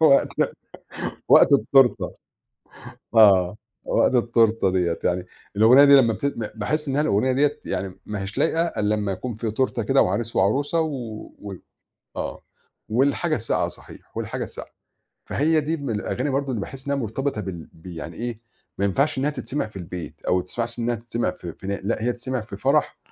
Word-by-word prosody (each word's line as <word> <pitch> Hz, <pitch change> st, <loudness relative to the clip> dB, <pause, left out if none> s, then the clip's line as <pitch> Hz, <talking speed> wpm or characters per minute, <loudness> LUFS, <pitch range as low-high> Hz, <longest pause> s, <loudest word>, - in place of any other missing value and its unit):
وقت 150 Hz, -4 st, +5 dB, 1.0 s
وقت -, -, +7 dB
التورتة 135 Hz, -2 st, +4 dB, 1.0 s
آه، 95 Hz, -4 st, +6 dB, 0.3 s
وقت -, -, +2 dB
التورتة 115 Hz, -4 st, +3 dB
ديَّة 90 Hz, -3 st, 0 dB
يعني 90 Hz, 0 st, 0 dB, 0.3 s
الأغنية 115 Hz, +7 st, +7 dB
دي 140 Hz, 0 st, +8 dB
لمّا 115 Hz, -5 st, +5 dB
بت 140 Hz, -, -5 dB
ب 115 Hz, -6 st, -2 dB
باحس 150 Hz, +8 st, -2 dB
إنها 140 Hz, +2 st, +1 dB
الأغنية 130 Hz, -2 st, +2 dB
دِيَّة 145 Hz, +3 st, +1 dB
يعني 95 Hz, 0 st, -4 dB
ما 105 Hz, -1 st, -4 dB
هياش 95 Hz, +2 st, -7 dB
لايقة 165 Hz, +1 st, +2 dB
إلَّا 105 Hz, -11 st, 0 dB
لمّا 105 Hz, -2 st, -2 dB
يكون 120 Hz, +6 st, -4 dB
في 110 Hz, 0 st, -3 dB
تورتة 120 Hz, 0 st, 0 dB
كده 135 Hz, +6 st, +3 dB
وعريس 110 Hz, +5 st, -1 dB
وعروسة، 140 Hz, -, +2 dB
و 125 Hz, -9 st, -5 dB
وال 100 Hz, -3 st, -8 dB, 0.5 s
آه، -, -, -4 dB, 0.5 s
والحاجة 140 Hz, +8 st, +1 dB
الساقعة 115 Hz, -3 st, -1 dB
صحيح، -, -, -13 dB
والحاجة -, -, -3 dB
الساقعة، -, -, -9 dB, 0.6 s
فهي 155 Hz, +2 st, +2 dB
دي 160 Hz, +3 st, -2 dB
من 135 Hz, -6 st, -3 dB
الأغاني 125 Hz, +6 st, -2 dB
برضه 140 Hz, 0 st, -1 dB
اللي 115 Hz, -6 st, -2 dB
باحس 135 Hz, +5 st, -8 dB
إنها 140 Hz, -, +1 dB
مرتبطة 130 Hz, 0 st, -2 dB
بال 90 Hz, -4 st, -7 dB
ب 80 Hz, -, -20 dB
يعني 85 Hz, -1 st, -7 dB
إيه 120 Hz, -1 st, -5 dB, 0.4 s
ما 100 Hz, -, +1 dB
ينفعش 135 Hz, +11 st, +1 dB
إنها 135 Hz, +3 st, +1 dB
تتسمع 145 Hz, -2 st, -3 dB
في 110 Hz, -, -20 dB
البيت 90 Hz, -1 st, -7 dB
أو -, -, +3 dB
ماتسمعش 115 Hz, +6 st, -4 dB
إنها 120 Hz, 0 st, 0 dB
تتسمع 115 Hz, -3 st, -2 dB
في 85 Hz, -2 st, -8 dB
في 95 Hz, -, -11 dB, 0.2 s
لأ 110 Hz, +1 st, -1 dB
هي 125 Hz, +1 st, +1 dB
تتسمع 130 Hz, 0 st, -4 dB
في 110 Hz, -, -9 dB
فرح -, -, +1 dB
115 Hz, 175 wpm, -23 LUFS, 100-140 Hz, 1.0 s, دي